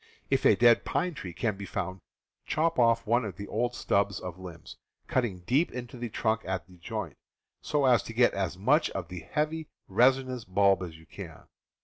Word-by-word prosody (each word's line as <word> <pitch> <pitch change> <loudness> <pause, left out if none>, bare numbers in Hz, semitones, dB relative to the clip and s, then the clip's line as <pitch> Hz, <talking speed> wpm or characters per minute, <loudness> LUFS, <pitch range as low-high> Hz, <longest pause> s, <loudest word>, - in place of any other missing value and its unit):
If - - +2
a - - +6
dead 120 -1 +5
pine 180 -1 -1
tree 95 - -7
can 105 +3 -2
be 100 - -6
found, 95 -1 -4 0.5
chop 165 -1 +1
off 115 -1 +4
one 120 +2 +2
of 100 -5 -5
the 100 - -7
^ - - -14
old 120 +3 0
stubs 100 -3 +1
of 90 -1 -7
limbs, 85 -4 -10 0.3
cutting 110 -8 -1
deep 135 - +1
into 125 +1 -7
the 120 -1 -5
trunk 110 +1 0
at 95 -4 -3
the 90 0 -18
joint, - - -5 0.5
so 145 -2 +1
as 120 -4 +5
to 115 - -7
get 120 +2 +4
as 95 -3 -2
much 135 - +3
of 90 -3 -5
the 90 -1 -6
heavy 155 - -2 0.2
resinous 130 +3 +2
bulb 100 0 +3
as 85 -3 -6
you 80 - -17
can. - - -10
110 Hz, 205 wpm, -29 LUFS, 95-125 Hz, 0.5 s, a